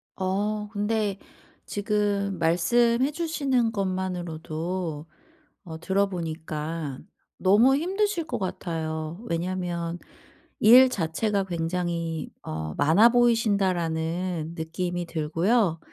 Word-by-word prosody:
어 210 Hz, +3 st, -1 dB
근데 210 Hz, -1 st, -1 dB, 0.5 s
지금 205 Hz, -2 st, -1 dB
말씀해 235 Hz, -, +3 dB
주시는 280 Hz, -7 st, 0 dB
것만으로도 175 Hz, -4 st, -3 dB, 0.6 s
어 160 Hz, -1 st, -8 dB
들어보니까 165 Hz, -6 st, -2 dB, 0.4 s
너무 220 Hz, +8 st, +5 dB
힘드실 385 Hz, +1 st, 0 dB
것 320 Hz, -, -3 dB
같아요. 160 Hz, -3 st, -4 dB
왜냐하면 175 Hz, 0 st, -2 dB, 0.6 s
'일 250 Hz, +4 st, +8 dB
자체가 195 Hz, +2 st, -1 dB
굉장히 170 Hz, -1 st, -2 dB
어 80 Hz, 0 st, -4 dB
많아 165 Hz, +11 st, +5 dB
보이신다.'라는 180 Hz, -8 st, +1 dB
느낌이 175 Hz, +2 st, -3 dB
들고요. 165 Hz, +4 st, +1 dB
185 Hz, 215 characters per minute, -26 LUFS, 165-210 Hz, 0.6 s, 일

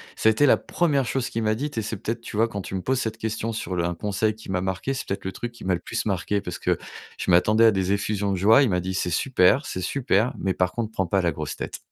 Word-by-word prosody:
ça 110 Hz, -, +3 dB
a -, -, +6 dB
été 145 Hz, +7 st, +3 dB
la -, -, +6 dB
1re 145 Hz, -6 st, 0 dB
chose 125 Hz, +1 st, -1 dB
qu'il 115 Hz, -, -2 dB
m'a 110 Hz, 0 st, +2 dB
dite 140 Hz, +4 st, -4 dB
et 110 Hz, -, 0 dB
c'est 110 Hz, +2 st, -3 dB
peut-être, 115 Hz, +4 st, -4 dB
tu 110 Hz, -, -7 dB
vois, 115 Hz, +2 st, +4 dB
quand 100 Hz, -4 st, -5 dB
tu -, -, -8 dB
me 95 Hz, -, -2 dB
poses 130 Hz, +5 st, 0 dB
cette 110 Hz, -3 st, -3 dB
question 110 Hz, +1 st, -2 dB
sur 100 Hz, -4 st, -4 dB
le 85 Hz, -, 0 dB
un 85 Hz, -, -1 dB
conseil 105 Hz, +4 st, -1 dB
qui 110 Hz, -1 st, -13 dB
m'a 95 Hz, -1 st, 0 dB
marqué, 95 Hz, +8 st, -2 dB
c'est 125 Hz, -, -5 dB
peut-être 95 Hz, -, -4 dB
le 95 Hz, -, -2 dB
truc 120 Hz, +4 st, -5 dB
qui 120 Hz, -, -13 dB
m'a 95 Hz, -1 st, +1 dB
le -, -, -5 dB
plus -, -, -4 dB
marqué 100 Hz, +1 st, 0 dB
parce 90 Hz, -3 st, -5 dB
que -, -, 0 dB, 0.4 s
je -, -, -2 dB
m'attendais 105 Hz, +6 st, +5 dB
à 110 Hz, -, +7 dB
des 95 Hz, -2 st, 0 dB
effusions 100 Hz, 0 st, 0 dB
de -, -, +1 dB
joie, 110 Hz, +9 st, +6 dB
il 130 Hz, -, +2 dB
m'a 90 Hz, -, +2 dB
dit: 95 Hz, +1 st, -3 dB
«C'est 90 Hz, -1 st, -1 dB
super, 130 Hz, -, +3 dB
c'est 95 Hz, -, -4 dB
super, 120 Hz, +2 st, +1 dB
mais 95 Hz, -1 st, -1 dB
par 90 Hz, -1 st, +1 dB
contre 115 Hz, -2 st, -3 dB
prends 95 Hz, -3 st, -1 dB
pas 95 Hz, +3 st, +1 dB
la 85 Hz, -2 st, +1 dB
grosse -, -, -5 dB
tête!» -, -, -6 dB
105 Hz, 300 wpm, -24 LUFS, 95-115 Hz, 0.4 s, à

